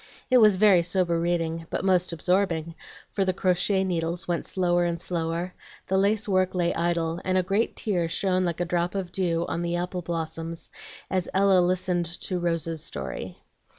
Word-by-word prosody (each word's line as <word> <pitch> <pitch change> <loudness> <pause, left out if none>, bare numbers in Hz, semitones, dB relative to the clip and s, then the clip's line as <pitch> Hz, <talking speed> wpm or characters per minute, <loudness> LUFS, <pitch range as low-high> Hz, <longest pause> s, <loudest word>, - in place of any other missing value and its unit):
It 255 - +7
was 215 -3 +6
very 195 -2 +5
sober 170 -1 0
reading, 165 -1 -1
but - - -2
most 180 -2 +2
absorbing; 170 -1 0 0.4
for 195 - 0
the 185 -1 +1
crochet 190 +1 +2
needles 175 0 -2
went 175 -1 -1
slower 175 -2 +1
and 170 -1 -1
slower, 170 +1 -3 0.3
the 190 - -1
lace 210 +3 +1
work 185 -2 +1
lay 175 -1 +1
idle, 170 0 -1
and 185 0 +1
a 185 - +3
great 200 +5 0
tear 175 -6 -1
shone 185 +2 +1
like 170 -2 -2
a - - +1
drop 175 +1 -1
of 185 -3 -3
dew 170 -3 0
on 170 - -2
the 170 0 -1
apple 180 +1 -2
blossoms 165 0 -5 0.4
as 185 -2 0
Ella 195 -1 +5
listened 180 -1 +1
to 180 -2 -2
"Rose's 165 -2 -1
Story." 70 - -6
175 Hz, 180 wpm, -26 LUFS, 170-185 Hz, 0.4 s, It